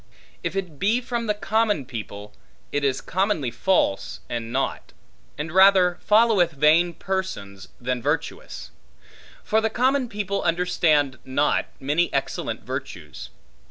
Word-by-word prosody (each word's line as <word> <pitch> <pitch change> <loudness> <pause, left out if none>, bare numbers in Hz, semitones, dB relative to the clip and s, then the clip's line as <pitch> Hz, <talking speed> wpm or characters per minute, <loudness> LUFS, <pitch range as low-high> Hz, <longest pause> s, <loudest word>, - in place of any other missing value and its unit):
If - - -3
it 180 -7 -4
be 220 +5 +2
from 240 -2 -3
the 210 - +1
common 210 - +1
people, 105 -4 -8 0.4
it 145 - -1
is 135 -2 +1
commonly 185 - 0
false 125 - 0
and 115 -1 -4
naught; 135 +2 -2 0.4
and 150 +2 -4
rather 185 -1 +5
followeth 210 -6 +4
vain 155 +5 +4
persons, 100 - -4
than 125 0 -2
virtuous. 160 - -3 0.7
For 220 +1 +2
the 220 - +1
common 255 +2 +1
people 200 -2 -2
understand 165 -5 +1
not 140 +3 +1
many 150 +6 +1
excellent 140 - -2
virtues. - - -7
175 Hz, 125 wpm, -24 LUFS, 135-205 Hz, 0.7 s, rather